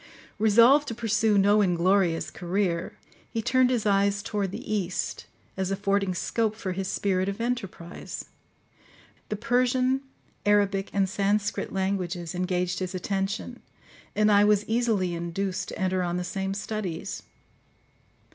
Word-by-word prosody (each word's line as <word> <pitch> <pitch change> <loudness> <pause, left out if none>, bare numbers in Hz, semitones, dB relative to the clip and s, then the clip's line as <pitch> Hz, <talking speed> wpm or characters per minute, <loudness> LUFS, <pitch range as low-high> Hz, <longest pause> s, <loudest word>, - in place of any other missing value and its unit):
Resolved 235 +7 +6
to 230 - -4
pursue 220 -2 +2
no 205 +2 +5
inglorious 180 -2 +2
career, 175 -1 -2 0.3
he 225 - -3
turned 255 +3 +3
his 240 -4 0
eyes 200 0 +2
toward 205 -3 -2
the 205 - -5
East, 190 -4 -2 0.3
as 190 -1 -2
affording 195 -1 0
scope 220 +4 0
for 200 -4 -4
his 190 +1 -3
spirit 190 -1 0
of 200 - -5
enterprise. 200 -8 -4 1.0
The 210 - -1
Persian, 255 +3 +1 0.4
Arabic, 200 -1 +2
and 195 -1 +2
Sanskrit 200 +1 0
languages 185 -3 -2
engaged 180 0 -1
his 185 0 -4
attention, 195 +6 -3 0.6
and 215 0 +4
I 205 0 +6
was 210 0 +3
easily 220 -6 +1
induced 170 +3 -3
to - - -7
enter 185 0 0
on 175 0 -1
the 180 - -2
same 195 +1 -3
studies. 200 -5 -4
200 Hz, 135 wpm, -27 LUFS, 185-215 Hz, 1.0 s, Resolved